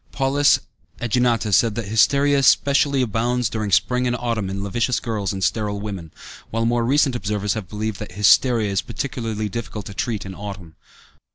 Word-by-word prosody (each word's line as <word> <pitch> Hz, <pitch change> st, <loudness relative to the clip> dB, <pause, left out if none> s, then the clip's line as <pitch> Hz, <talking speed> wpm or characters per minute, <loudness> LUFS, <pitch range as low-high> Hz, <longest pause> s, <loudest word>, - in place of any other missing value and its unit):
Paulus 140 Hz, +1 st, +3 dB, 0.4 s
Ægineta 120 Hz, -3 st, +1 dB
said 115 Hz, +1 st, +3 dB
that 115 Hz, -3 st, -4 dB
hysteria 140 Hz, +6 st, +3 dB
specially 140 Hz, 0 st, +3 dB
abounds 120 Hz, 0 st, 0 dB
during 110 Hz, -2 st, -3 dB
spring 125 Hz, +7 st, +2 dB
and 120 Hz, -, 0 dB
autumn 115 Hz, -5 st, -2 dB
in 95 Hz, 0 st, -4 dB
lascivious 115 Hz, +5 st, 0 dB
girls 105 Hz, -5 st, -3 dB
and 95 Hz, -1 st, -4 dB
sterile 105 Hz, 0 st, -1 dB
women, 100 Hz, -6 st, -6 dB, 0.4 s
while 115 Hz, +1 st, -1 dB
more 120 Hz, 0 st, +1 dB
recent 135 Hz, +1 st, +2 dB
observers 105 Hz, -3 st, -1 dB
have 105 Hz, -6 st, -6 dB
believed 105 Hz, -1 st, -4 dB
that 105 Hz, -4 st, -7 dB
hysteria 105 Hz, +2 st, +3 dB
is 95 Hz, -, 0 dB
particularly 115 Hz, -2 st, -4 dB
difficult 105 Hz, -1 st, -6 dB
to 100 Hz, -, -8 dB
treat 105 Hz, +1 st, -3 dB
in 95 Hz, -, -7 dB
autumn. 95 Hz, -4 st, -8 dB
110 Hz, 170 wpm, -21 LUFS, 100-125 Hz, 0.4 s, Paulus